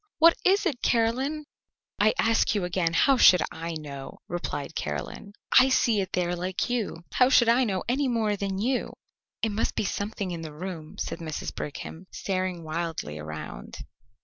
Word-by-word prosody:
What 335 +1 +7
is 395 +2 +3
it, 280 -8 -1
Caroline?" 260 +6 +1 0.5
"I - - +4
ask 225 -1 +2
you 200 - 0
again, 180 -2 0
how 270 +10 +4
should 180 -7 +7
I 165 0 -5
know?" 140 -3 -7
replied 165 -4 -4
Caroline. 200 - -5 0.3
"I 260 +1 +5
see 230 -5 +3
it 190 0 -5
there 180 -1 0
like 185 +6 -2
you. 215 -8 -2
How 250 0 +5
should 240 -3 +5
I 240 +2 +4
know 190 -4 -1
any 265 +4 +1
more 225 -4 +1
than 195 -1 -3
you?" 250 +5 -1 0.5
"It 220 - +2
must 210 +2 -1
be - - 0
something 200 -2 -3
in 170 -1 -4
the 155 -2 -8
room," 165 -2 -7
said 165 - -4
Mrs. 160 -2 -5
Brigham, 160 +4 -7
staring 185 -3 -2
wildly 155 - -4
around. 80 +1 -7
190 Hz, 175 wpm, -27 LUFS, 165-235 Hz, 0.5 s, What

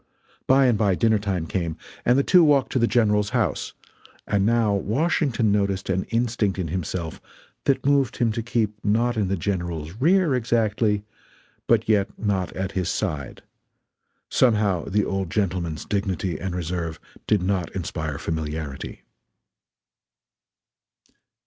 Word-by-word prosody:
By 135 +1 +5
and 120 -4 +3
by 100 -4 +3
dinner 110 +2 +3
time 95 -5 -2
came, 85 -2 -3 0.3
and 125 +2 +4
the 140 - +3
two 180 +2 +6
walked 145 -4 +3
to 130 - +1
the 115 - +3
General's 105 -2 +2
house; - - -1 0.5
and 100 -1 +1
now 115 -3 +3
Washington 120 - +1
noticed 100 -2 0
an 95 0 0
instinct 115 -4 0
in 90 -4 -2
himself 85 -1 -4 0.4
that 140 -2 +1
moved 140 -4 +2
him 115 -2 +2
to 115 - -2
keep 110 -3 -2
not 115 +4 +2
in 105 -3 0
the 95 +1 -1
General's 85 -4 -3
rear, 170 +1 +3
exactly, 110 -3 +1 0.6
but 115 -2 +3
yet 105 -3 +3
not 100 -4 -1
at 95 0 -3
his 90 -3 -1
side 75 - -3 0.8
somehow 105 -8 +2
the 105 +1 +1
old 95 -2 -2
gentleman's 85 -6 -2
dignity 95 -3 -2
and 95 -2 -4
reserve 85 -2 -3 0.3
did 105 -4 +2
not 90 -3 0
inspire 80 -5 -3
familiarity. 80 -3 -5
100 Hz, 140 wpm, -24 LUFS, 90-115 Hz, 0.8 s, two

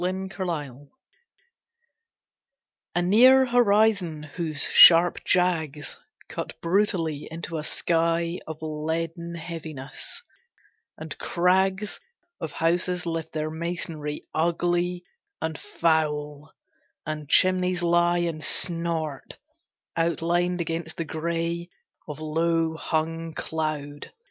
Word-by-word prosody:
New 180 - +1 0.3
York - - -16
at 190 - -1
Night 145 -4 -5 2.1
A 175 - +2
near 255 +8 +6
horizon 210 -9 +2
whose 155 -1 -5
sharp 170 +1 +7
jags 160 -5 0 0.3
Cut - - -6
brutally 170 -5 0
into 165 0 -5
a - - -5
sky 170 +1 0
Of 160 0 -7
leaden 165 +2 -3
heaviness, 155 -4 -7 0.7
and - - -7
crags 190 +3 +1 0.4
Of 160 -3 -4
houses 175 +2 0
lift 165 -1 -4
their 155 0 -2
masonry 160 -2 -4
Ugly 175 +2 0 0.4
and 160 0 -3
foul, 150 -2 -1 0.5
and 150 -1 -5
chimneys 185 0 +3
lie 175 0 +3
And 165 -2 -3
snort, 165 -4 -2 0.6
outlined 170 +2 0
against 165 0 -4
the 165 - -2
gray 170 +2 -3 0.4
Of 150 - -6
lowhung 160 0 -1
cloud. 150 -3 -4
165 Hz, 100 wpm, -25 LUFS, 155-175 Hz, 2.1 s, sharp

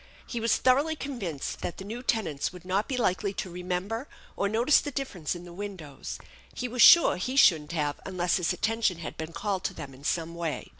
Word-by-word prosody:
He 240 - -4
was 230 +1 +2
thoroughly 280 +5 +3
convinced 225 - -5
that - - -4
the 190 - -8
new 230 +4 -5
tenants 180 - -1
would 180 -1 -12
not 190 +3 0
be 260 - -2
likely 200 -3 0
to 185 - -5
remember 180 - -3 0.3
or 200 - 0
notice 235 +7 +4
the - - -4
difference 225 - -3
in 175 - -8
the 175 - -11
windows; 180 -8 -7 0.4
he 250 - -2
was 245 0 -1
sure 340 - +8
he 255 +9 -3
shouldn't 160 - +5
have 150 -3 -1
unless 180 -2 0
his 180 -3 0
atten 225 +1 -1
tion 185 -6 +2
had 165 - -6
been 160 +1 -6
called 190 +2 -2
to - - -2
them 135 -1 -8
in 130 +2 -15
some 165 +2 -1
way. 170 -2 -4
185 Hz, 215 wpm, -28 LUFS, 170-230 Hz, 0.4 s, sure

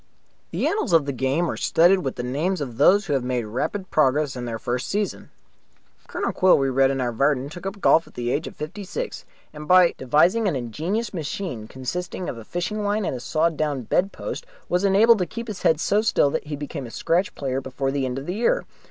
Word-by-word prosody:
The - - -2
annals 410 - 0
of 160 -4 +5
the 140 - -1
game 135 +6 0
are - - -4
studded 180 +3 +3
with 135 - -3
the 120 - -4
names 155 +10 -1
of 125 -6 -5
those 195 +9 +5
who - - -1
have 135 -3 +1
made 125 -1 -1
rapid 185 - -3
progress 145 -1 +2
in 125 -1 -5
their 115 -1 -3
first 125 +4 -3
season. 205 0 -2 0.8
Colonel - - -2
Quill, 185 0 +4
we 135 -1 +1
read 135 +1 +3
in 135 0 -1
our 125 -2 0
Vardon, 135 +2 +1
took 175 +3 -7
up 195 +1 -6
golf 165 -3 +4
at - - -18
the 120 0 -2
age 155 +5 -1
of - - -9
fifty 170 +7 -6
six, 485 - -5 0.3
and 150 0 -9
by 180 -2 +6
devising 175 - +3
an 175 - 0
ingenious 165 - -3
machine 155 - -4
consisting 175 +9 -5
of 120 - -5
a - - -9
fishing 175 - -3
line 205 0 0
and - - -2
a - - -5
sawn 160 +6 0
down 145 -4 -1
bedpost 185 - -2 0.2
was 180 +2 0
enabled 210 +3 +5
to 180 - 0
keep 230 +7 -7
his 210 -4 -6
head 160 - +3
so 205 +5 +2
still 175 -9 +2
that - - -3
he 150 - -3
became 145 -2 -6
a - - -9
scratch 175 - 0
player 135 -1 -2
before 135 +1 -3
the 140 -1 -1
end 130 0 -2
of 135 - -5
the 180 - -3
year. 240 - +1
155 Hz, 230 wpm, -23 LUFS, 130-185 Hz, 0.8 s, by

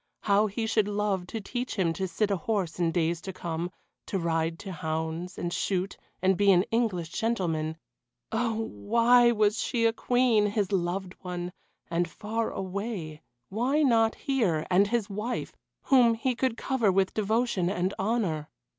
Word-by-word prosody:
How 205 +1 +3
he 220 +3 -3
should 220 -2 +2
love 205 -3 -1
to 225 - -4
teach 245 +4 -4
him 175 -5 +1
to 190 +3 -2
sit 205 +4 0
a - - +3
horse 185 -2 -2
in 170 -2 +2
days 170 -1 0
to 190 - -5
come, 170 -1 -4 0.4
to 195 - -1
ride 165 -1 0
to 195 - -7
hounds, 160 +2 -3
and 175 0 -3
shoot, 190 0 -1 0.3
and 190 +1 +4
be 200 +1 +4
an 180 -1 +5
English 210 -8 0
gentleman. 165 -8 -1 0.5
Oh! 225 0 0
why 235 - +4
was 215 -1 +2
she 230 -2 0
a 225 - +4
Queen, 240 -3 +3
his 205 -2 -1
loved 185 0 -1
one, 180 -1 -4 0.4
and 170 0 0
far 220 +5 -2
away 190 -5 -4 0.3
why 255 +9 +1
not 225 -4 +3
here, 210 - 0
and 195 +3 +5
his 225 -1 0
wife, 215 +4 -4 0.3
whom 245 -4 +5
he 255 +3 0
could 250 -1 -1
cover 240 -7 +1
with 190 0 +1
devotion 215 -3 +1
and 185 0 -1
honour? 190 -8 -1
200 Hz, 165 wpm, -28 LUFS, 175-225 Hz, 0.5 s, an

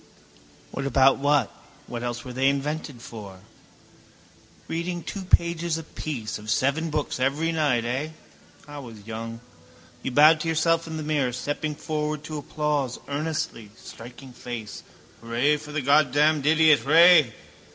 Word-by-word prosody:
What 135 0 -3
about 135 +1 +4
what? 145 0 +2 0.3
What 120 -1 -6
else 120 0 -4
were 125 - -7
they 135 +2 +3
invented 140 -2 -3
for? 100 -6 -10 1.3
Reading 170 +1 -3
two 200 - -6
pages 170 -2 +1
apiece 150 -9 -5
of 105 +1 -10
seven 140 +8 +1
books 150 -3 -2
every 145 +6 0
night, 145 -8 +1
eh? 130 +6 -2 0.6
I 145 0 -8
was 115 -6 -11
young. 115 +1 -6 0.6
You - - -3
bowed 155 +4 +6
to 165 - -4
yourself 165 +1 +1
in 160 0 -5
the 155 - -4
mirror, 145 -4 0
stepping 145 +4 -3
forward 150 0 -3
to 155 -1 -5
applause 145 -4 -2
earnestly, 145 -7 -3
striking 125 +3 -12
face. 120 -3 -7 0.4
Hurray 120 +6 +1
for 150 - -10
the 155 0 -2
Goddamned 145 +1 +3
idiot! 155 -1 +5
Hray! 160 -5 +6
145 Hz, 140 wpm, -25 LUFS, 125-155 Hz, 1.3 s, bowed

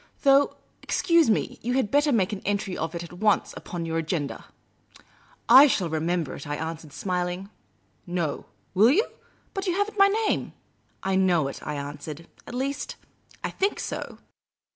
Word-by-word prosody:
Though, 280 0 +5 0.3
excuse 335 -6 +3
me, 215 - 0
you 245 +2 -1
had 255 -6 +1
better 290 +1 +4
make 210 -5 +2
an 195 - -5
entry 200 -2 -1
of 160 +2 -3
it 170 - -4
at 170 - -10
once 210 +3 +1
upon 170 -2 -5
your 165 0 -1
agenda." 155 -3 -3 0.5
" - - -30
I 295 - +8
shall 185 - 0
remember 160 -1 -1
it,*' 140 - -8
I 145 - -2
answered, 160 0 -5
smiling. 180 +3 -3 0.3
" - - -40
No; 155 -4 -2 0.3
will 205 +5 +6
you? 385 - +4 0.5
But 390 0 -3
you 355 - +1
have 405 +2 0
n't 425 - -10
my 395 - +8
name." 430 +2 0 0.2
*' - - -41
I 190 0 +1
know 180 -6 +3
it," - - -8
I 150 - -4
answered. 145 +3 -7
" - - -25
At 245 - -7
least, 275 +3 -3 0.5
I - - -2
think 395 +2 0
so. - - -5
190 Hz, 185 wpm, -26 LUFS, 165-275 Hz, 0.5 s, I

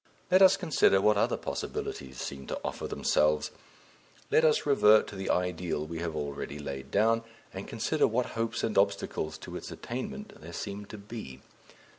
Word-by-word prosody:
Let 185 +1 +6
us 190 0 +8
consider 155 - +3
what 105 +2 +4
other 100 - +2
possibilities 65 -2 -5
seem 70 -1 -6
to - - -3
offer - - -3
themselves. 75 0 +2 0.8
Let 160 - +5
us 155 -1 +3
revert 110 -7 +6
to - - -9
the 95 0 -4
ideal 90 -4 0
we 80 +1 -6
have 85 -2 -3
already 70 -1 -4
laid 70 -2 -6
down, 115 +5 +3 0.3
and - - -6
consider - - +1
what 120 +2 +1
hopes 115 0 -2
and 110 -3 +2
obstacles 100 -6 0
to - - -9
its - - -6
attainment 130 - -6
there 85 +2 -10
seem 100 +2 -5
to 110 - -8
be. 100 - -8
100 Hz, 170 wpm, -29 LUFS, 75-115 Hz, 0.8 s, us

